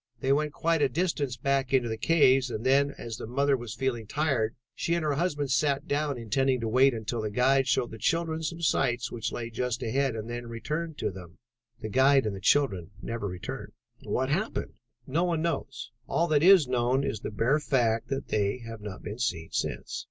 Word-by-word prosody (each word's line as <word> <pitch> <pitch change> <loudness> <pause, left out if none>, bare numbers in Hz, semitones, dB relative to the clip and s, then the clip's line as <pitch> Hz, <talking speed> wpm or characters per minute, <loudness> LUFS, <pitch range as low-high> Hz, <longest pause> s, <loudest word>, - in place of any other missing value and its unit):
They 135 +2 +2
went 150 +1 0
quite 165 +1 0
a 140 - +3
distance 145 -4 -1
back 135 +1 0
into 125 -3 +3
the 110 - -2
caves 135 -1 +4
and 115 0 -5
then, 140 +2 +4
as 115 -2 -6
the - - -7
mother 140 +3 +2
was 120 -3 -6
feeling 120 -5 -2
tired, 130 -6 0 0.2
she 170 - -1
and 170 - -1
her 150 -2 +1
husband 145 -3 -1
sat 140 +4 +1
down, 145 -2 0
intending 130 +3 +1
to 115 - -1
wait 130 +3 +4
until 110 +1 -3
the 110 - -2
guide 130 +4 +3
showed 120 -1 +1
the 110 - -9
children 165 +2 0
some 165 +1 -4
sights 125 -5 +1
which 115 -2 -3
lay 115 -1 -5
just 125 +1 -2
ahead 130 +2 0
and 110 0 -5
then 120 0 -5
return 150 +8 -4
to - - -2
them. 90 -1 -11 0.4
The 110 - -4
guide 135 +2 +4
and 105 -2 -2
the 95 - -8
children 95 - +2
never 115 0 -4
returned." 90 -1 -6 0.3
"What 130 +1 -1
happened?" 195 +10 -2 0.3
"No 160 +6 0
one 170 -3 0
knows. 170 -1 -3 0.2
All 170 - +1
that 150 -2 +3
is 180 -4 +7
known 125 +2 +1
is 110 - -2
the - - -5
bare 120 +8 +1
fact 120 -6 +1
that 135 0 -4
they 100 +1 +1
have 115 -1 -8
not 105 -3 -8
been 105 +3 -6
seen 85 -10 -2
since." - - -3
130 Hz, 210 wpm, -28 LUFS, 115-145 Hz, 0.4 s, is